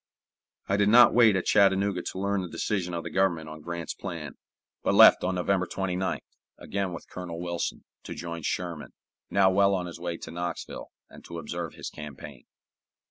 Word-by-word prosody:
I 100 - +1
did 100 0 +3
not 120 +2 +8
wait 115 -4 +6
at 95 - -1
Chattanooga 100 -2 +3
to 95 - -5
learn 100 0 0
the 90 - -6
decision 90 -3 -2
of 85 - -3
the - - -6
Government 90 -5 +1
on 80 0 -9
Grant's 85 -1 -5
plan, - - -6 0.5
but - - +1
left - - +8
on 90 +1 0
November 90 0 +1
29th, 95 +1 -2 0.4
again 100 -2 -3
with 85 - -8
Colonel 85 -2 -7
Wilson, 85 -1 -3 0.2
to - - -6
join 85 -1 -6
Sherman, 85 0 -4 0.4
now 95 -1 +4
well 100 +1 +4
on 90 -1 -2
his 85 -1 -8
way 85 -1 -3
to - - -9
Knoxville, 85 0 -5 0.2
and - - -15
to 85 - -7
observe 85 -1 -5
his - - -7
campaign. 75 -3 -10
90 Hz, 185 wpm, -27 LUFS, 85-95 Hz, 0.5 s, not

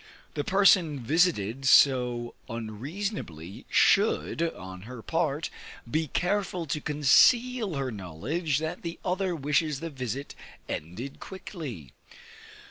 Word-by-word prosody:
The 145 - -2
person 180 -6 +4
visited 135 - +1
so 125 -3 +4 0.2
unseasonably, 115 - -5
should, 85 - +3
on 95 - -4
her 125 -3 -8
part, 160 -2 -1 0.4
be 155 +6 0
careful 180 +1 -1
to 150 +1 -3
conceal 205 - +4
her 135 -2 -2
knowledge 115 - -2
that 160 +3 -3
the 170 0 -5
other 185 -1 0
wishes 150 0 0
the 165 +1 -5
visit 130 0 -5 0.3
ended 105 - -6
quickly. 155 - -8
145 Hz, 110 wpm, -28 LUFS, 120-175 Hz, 0.4 s, person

